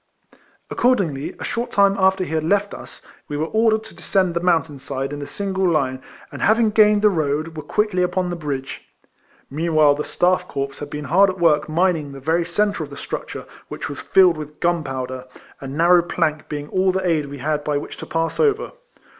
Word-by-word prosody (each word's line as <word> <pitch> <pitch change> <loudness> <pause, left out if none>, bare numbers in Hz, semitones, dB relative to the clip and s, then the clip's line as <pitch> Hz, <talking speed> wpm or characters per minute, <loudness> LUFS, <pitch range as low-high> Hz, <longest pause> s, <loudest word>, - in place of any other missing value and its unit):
Accordingly, 185 - 0
a - - -6
short 240 +1 -3
time 200 -3 +3
after 190 -1 +2
he 165 - -5
had 160 -1 0
left 200 +4 +1
OS, - - -11 0.2
we 145 - -4
were 155 - 0
ordered 220 +3 +2
to 220 - -13
descend 185 -3 0
the 170 - 0
moun 175 -2 +3
tain 145 -3 -12
side 135 +1 -4
in 145 0 -5
single 190 -2 -1
hie, 130 -3 0 0.3
and - - -8
having 220 +1 +3
gained 210 -1 +4
the 210 - +7
road, 155 -1 -1
were 155 - -5
quickly 210 +4 0
upon 180 0 0
the - - -2
bridge. 140 -5 -5 0.7
Meanwhile 155 -1 +3
the 145 - -3
StaiF 180 0 +1
Corps 135 0 -4
had 145 - -6
been 150 0 -6
hard 190 +8 +4
at 185 - -4
work 155 -3 +2
mining 160 -3 0
the 135 - -9
very 165 +5 0
centre 205 +2 0
of - - -8
the - - -10
structure, - - -6 0.2
^vdiich - - -5
was - - -6
filled 180 -4 +4
with 150 0 -9
gunpowder, 135 -7 -2 0.3
a 135 - -7
narrow 170 +6 +4
plank 165 -3 -2
being 145 -1 -5
all 185 0 +2
the 190 0 -2
aid 155 -4 +1
we 140 0 -8
had 150 +2 -2
by 145 -1 0
which 145 - -6
to - - -8
pass 165 0 -2
over. 440 0 +1
165 Hz, 205 wpm, -21 LUFS, 145-190 Hz, 0.7 s, the